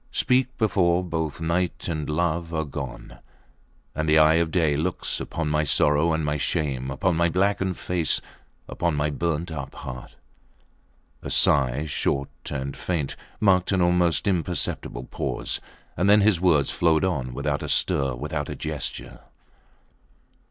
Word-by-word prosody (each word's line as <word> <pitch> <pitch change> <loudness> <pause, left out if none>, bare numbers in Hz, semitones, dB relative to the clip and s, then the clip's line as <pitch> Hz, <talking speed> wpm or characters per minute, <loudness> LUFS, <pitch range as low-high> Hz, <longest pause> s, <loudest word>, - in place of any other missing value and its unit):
Speak 130 +1 +1
before 90 -5 +2
both 80 -4 -3
night 85 +2 -1
and 75 -4 -3
love 85 +1 -1
are 80 -1 0
gone 70 -3 -7 0.7
and 80 0 -1
the 75 - +5
eye 80 0 +6
of 85 - 0
day 80 -4 +2
looks 85 +5 -2
upon 80 0 -3
my 75 0 +1
sorrow 75 +2 +3
and 80 -1 0
my 75 0 0
shame; 70 -4 -1
upon 85 +6 0
my 85 +1 +2
blackened 95 +1 0
face; 85 -3 0 0.5
upon 85 -3 -1
my 75 +1 0
burnt 85 +2 -2
up 75 -3 -6
heart. 65 0 -8 1.1
A - - -6
sigh, 70 +1 +3
short 70 -2 -1 0.2
and 70 -1 -4
faint, 80 -6 -2 0.2
marked 95 -3 +3
an 95 - +2
almost 85 -1 +2
imperceptible 85 -9 -2
pause, - - -3 0.3
and 90 +4 +1
then 105 +1 +7
his 100 -4 +3
words 80 -7 +3
flowed 80 -1 +2
on, 70 -9 -1
without 70 0 -1
a - - -5
stir, 70 -3 +2
without 75 +2 -4
a - - -4
gesture. - - -5
80 Hz, 150 wpm, -25 LUFS, 75-90 Hz, 1.1 s, then